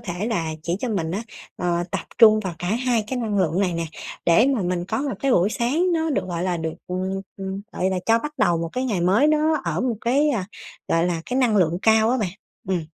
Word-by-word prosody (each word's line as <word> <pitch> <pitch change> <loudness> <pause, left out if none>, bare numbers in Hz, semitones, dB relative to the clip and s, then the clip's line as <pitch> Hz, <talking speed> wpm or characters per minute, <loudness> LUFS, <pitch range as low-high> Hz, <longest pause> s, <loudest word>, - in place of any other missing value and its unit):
thể 180 +3 -4
là 165 -9 -1
chỉ 170 +2 -1
cho 255 - -2
mình 170 -7 -1
á, 200 +5 -2 0.3
ờ, 175 -1 0
tập - - -2 0.2
trung 215 -2 +7
vào 185 -4 -4
cả 175 - -4
hai 235 0 +1
cái 255 +2 -3
năng 215 -4 -1
lượng 180 0 +1
này 185 -3 +1
nè, 165 0 -2 0.4
để 195 +9 +5
mà 215 - -1
mình 175 0 -1
có - - -2
một 280 - -2
cái 275 - +1
buổi 185 +1 +3
sáng 310 +12 +1
nó 320 -1 0
được, 275 - 0
gọi 175 -1 -3
là, 180 -2 0
được, 160 0 -3
ừm, 185 +1 -2 0.2
ừm, 195 0 -5
gọi 190 +1 0
là 190 - -1
cho 225 0 +5
bắt 300 +4 -5
đầu 170 -7 +3
một 165 0 -3
cái 255 +1 -1
ngày 210 -8 -1
mới 195 +11 +4
nó 305 0 +2
ở - - -1
một 245 -3 0
cái, 280 +5 +2
ờ, 225 -8 0 0.5
gọi 165 +1 +2
là, 165 -2 -2
cái 250 - -1
năng 235 -5 +3
lượng 175 -2 +2
cao 220 +1 +4
á 255 - +2
bạn 195 -5 -1 0.4
ừm. 180 -3 0
200 Hz, 255 wpm, -23 LUFS, 175-245 Hz, 0.5 s, trung